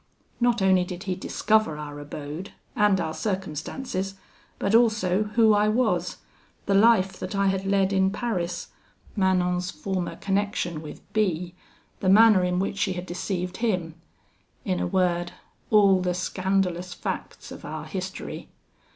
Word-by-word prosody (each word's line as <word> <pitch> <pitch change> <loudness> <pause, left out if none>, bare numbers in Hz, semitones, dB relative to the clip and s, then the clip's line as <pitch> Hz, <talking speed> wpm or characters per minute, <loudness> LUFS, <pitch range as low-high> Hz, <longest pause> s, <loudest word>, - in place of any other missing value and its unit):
Not 240 -4 +2
only 190 -1 +4
did 180 +1 -7
he 190 -3 -1
discover 210 -2 +1
our 145 -1 -7
abode 150 +5 -7 0.2
and 210 -2 +3
our 160 -2 -2
circumstances, 190 - -3 0.4
but 200 - -1
also 215 -4 +3
who 225 -2 +6
I 210 0 +3
was 215 -6 +1 0.5
the 200 - +1
life 200 -2 +5
that - - -5
I 200 0 +3
had 190 0 -1
led 195 0 +2
in 190 0 +3
Paris 190 -5 -3 0.5
Manon's 180 -2 +1
former 190 -3 -3
connection 195 -5 -1
with 155 - -9
B, 180 -5 0 0.5
the 185 - +1
manner 210 -1 +7
in 180 0 0
which 195 +1 -2
she 190 -2 +1
had 180 0 -5
deceived 180 0 -3
him: 185 -9 -1 0.7
in 90 - 0
a 90 - -1
word, 175 - 0 0.4
all 200 -3 +5
the 180 -1 0
scandalous 185 -1 -1
facts - - -5
of - - -9
our - - -6
history. - - -6
190 Hz, 145 wpm, -25 LUFS, 180-205 Hz, 0.7 s, manner